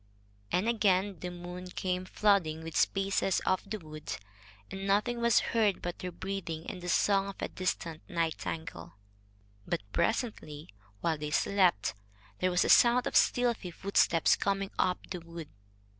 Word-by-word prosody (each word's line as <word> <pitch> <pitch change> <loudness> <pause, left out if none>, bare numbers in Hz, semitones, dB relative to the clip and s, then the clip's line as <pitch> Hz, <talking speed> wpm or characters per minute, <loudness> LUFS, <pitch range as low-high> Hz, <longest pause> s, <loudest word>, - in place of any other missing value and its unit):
And 180 +5 +1
again 200 -5 +2
the 180 - -4
moon 180 +1 -8
came 185 0 -2
flooding 185 -6 +2
the 165 - -6
spaces 195 +2 +1
of 185 - +1
the 215 - -2
wood, 155 - -7 0.5
and 195 0 -5
nothing 225 +4 +1
was 235 -2 +5
heard 215 -4 +2
but 175 0 -5
their 180 - -4
breathing 170 -3 -5
and 180 - -6
the 175 - -5
song 195 +2 +3
of 200 - -6
a - - -2
distant 165 -3 -3
nightingale. 160 - -3 0.7
But - - -1
presently 170 - -2 0.3
while 160 -3 0
they 150 0 -3
slept 180 - +2 0.5
there 185 - +2
was 180 0 +2
a - - +1
sound 245 +1 +6
of - - -3
stealthy 240 -6 +2
footsteps 170 -2 +3
coming 195 0 -1
up 180 -1 +2
the 180 - -3
wood. 170 -2 -9
185 Hz, 155 wpm, -31 LUFS, 165-200 Hz, 0.7 s, sound